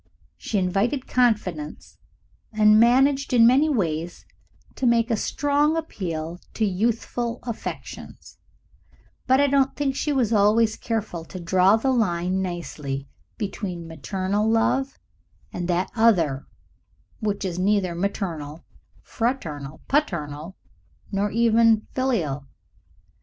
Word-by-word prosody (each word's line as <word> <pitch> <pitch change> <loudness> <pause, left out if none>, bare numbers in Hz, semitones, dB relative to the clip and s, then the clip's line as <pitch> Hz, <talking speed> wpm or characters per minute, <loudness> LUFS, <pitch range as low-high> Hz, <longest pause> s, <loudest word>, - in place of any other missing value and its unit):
She 215 - -3
invited 200 +9 0
confidence 205 -11 -1 0.5
and 215 -1 +5
managed 270 +4 +3
in 235 -2 +6
many 270 +6 +5
ways 170 - -2 0.5
to 260 - -1
make 235 0 +3
a - - +3
strong 290 +7 +1
appeal 170 - -4 0.2
to 220 - +1
youthful 230 +4 -1
affections, 235 -3 -8 0.9
but 260 +1 +4
I 285 - +5
don't 275 -1 +2
think 275 -2 -1
she 295 - -1
was 245 -5 +1
always 215 +2 +3
careful 215 -7 -3
to 185 - -9
draw 185 +3 +4
the 265 +4 0
line 185 -5 0
nicely 150 -6 -5 0.3
between 190 -5 -5
maternal 190 +7 -2
love 265 +4 +1 0.6
and 175 -1 -3
that 180 +1 0
other 175 - +2 0.7
which 205 -2 -2
is 180 -1 -3
neither 195 -2 +1
maternal, 170 -5 -4 0.4
fraternal, 160 - -3
paternal, 170 - -2 0.5
nor 200 +1 0
even 230 0 +3
filial. 165 - -1
210 Hz, 115 wpm, -24 LUFS, 175-240 Hz, 0.9 s, in